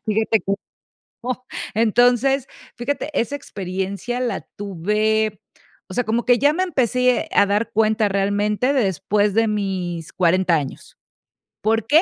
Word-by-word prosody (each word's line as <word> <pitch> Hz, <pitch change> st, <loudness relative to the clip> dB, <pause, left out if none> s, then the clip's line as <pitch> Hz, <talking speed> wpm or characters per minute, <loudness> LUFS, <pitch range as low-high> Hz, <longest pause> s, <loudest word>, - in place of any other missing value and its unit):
fíjate 220 Hz, 0 st, +2 dB
que 195 Hz, -, -2 dB, 0.7 s
no. 255 Hz, 0 st, -4 dB, 0.3 s
Entonces, 245 Hz, +4 st, +3 dB, 0.3 s
fíjate, 285 Hz, +5 st, -3 dB
esa 260 Hz, +5 st, -1 dB
experiencia 195 Hz, 0 st, -4 dB
la 240 Hz, -6 st, -2 dB
tuve, 210 Hz, +2 st, 0 dB, 0.5 s
o 185 Hz, -, -9 dB
sea, 245 Hz, +4 st, 0 dB
como 230 Hz, +2 st, 0 dB
que 245 Hz, -2 st, +4 dB
ya 285 Hz, +2 st, +4 dB
me 365 Hz, +4 st, 0 dB
empecé 250 Hz, -6 st, +1 dB
a 200 Hz, -, +6 dB
dar 210 Hz, +3 st, 0 dB
cuenta 215 Hz, -1 st, +2 dB
realmente 205 Hz, +6 st, +1 dB
después 205 Hz, -, +1 dB
de 225 Hz, 0 st, +3 dB
mis 185 Hz, -6 st, -3 dB
40 180 Hz, 0 st, +3 dB
años, 145 Hz, -4 st, -5 dB, 0.6 s
¿por 225 Hz, +1 st, +1 dB
qué? 310 Hz, +6 st, +5 dB
215 Hz, 135 wpm, -21 LUFS, 200-245 Hz, 0.7 s, a